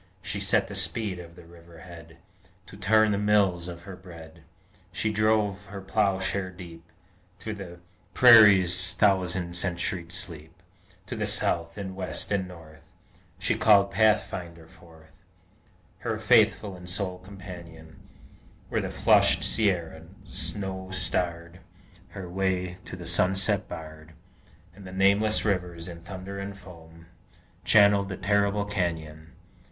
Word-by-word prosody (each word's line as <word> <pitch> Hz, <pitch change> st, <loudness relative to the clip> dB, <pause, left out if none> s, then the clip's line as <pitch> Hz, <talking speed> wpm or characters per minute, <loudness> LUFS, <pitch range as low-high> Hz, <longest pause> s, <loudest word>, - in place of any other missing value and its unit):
She 100 Hz, -, -3 dB
set 100 Hz, +1 st, +2 dB
the -, -, -9 dB
speed 100 Hz, +1 st, -1 dB
of 85 Hz, -1 st, -11 dB
the 90 Hz, -1 st, -14 dB
river 85 Hz, -1 st, -16 dB
head 85 Hz, -2 st, -13 dB, 0.5 s
To -, -, -13 dB
turn 110 Hz, -1 st, +3 dB
the 100 Hz, -, 0 dB
mills 100 Hz, -4 st, +2 dB
of 85 Hz, -1 st, -8 dB
her 95 Hz, 0 st, -9 dB
bread; 80 Hz, -3 st, -13 dB, 0.5 s
She 110 Hz, 0 st, -1 dB
drove 105 Hz, -1 st, +1 dB
her 100 Hz, 0 st, -8 dB
ploughshare 95 Hz, -1 st, 0 dB
deep 85 Hz, -3 st, -11 dB, 0.5 s
Through 110 Hz, -, -6 dB
the 95 Hz, -4 st, -9 dB, 0.4 s
prairie's 95 Hz, -6 st, +7 dB
thousand 90 Hz, -3 st, +1 dB
centuried 85 Hz, -1 st, -1 dB
sleep, 85 Hz, -2 st, -6 dB, 0.5 s
To -, -, -6 dB
the -, -, -2 dB
South, 85 Hz, +1 st, -1 dB
and 95 Hz, -2 st, -6 dB
West, 95 Hz, +1 st, -5 dB
and 95 Hz, -2 st, 0 dB
North, 80 Hz, -3 st, -14 dB, 0.6 s
She -, -, 0 dB
called 100 Hz, -2 st, +4 dB
Pathfinder 95 Hz, -5 st, 0 dB
forth, 80 Hz, -2 st, -19 dB, 0.9 s
Her -, -, -3 dB
faithful 100 Hz, -3 st, +3 dB
and 90 Hz, 0 st, -10 dB
sole 90 Hz, 0 st, -3 dB
companion 85 Hz, -4 st, -11 dB, 0.7 s
Where -, -, 0 dB
the -, -, -4 dB
flushed -, -, +3 dB
Sierra, 90 Hz, -7 st, 0 dB, 0.2 s
snow 95 Hz, -2 st, -4 dB
starred, 85 Hz, -2 st, -3 dB, 0.5 s
Her 95 Hz, -2 st, -8 dB
way 90 Hz, -1 st, -2 dB
to -, -, -8 dB
the 90 Hz, -1 st, -9 dB
sunset 95 Hz, +4 st, +1 dB
barred, 80 Hz, 0 st, -10 dB, 0.6 s
And 100 Hz, +2 st, -14 dB
the 95 Hz, -, -9 dB
nameless 100 Hz, +3 st, +2 dB
rivers 90 Hz, -4 st, -2 dB
in 85 Hz, -1 st, -9 dB
thunder 95 Hz, +3 st, -8 dB
and 100 Hz, 0 st, -6 dB
foam 85 Hz, -3 st, -15 dB, 0.6 s
Channelled 100 Hz, -2 st, +5 dB
the 95 Hz, -, -5 dB
terrible 100 Hz, 0 st, +1 dB
canyon! 80 Hz, -5 st, -4 dB
95 Hz, 135 wpm, -26 LUFS, 85-100 Hz, 0.9 s, prairie's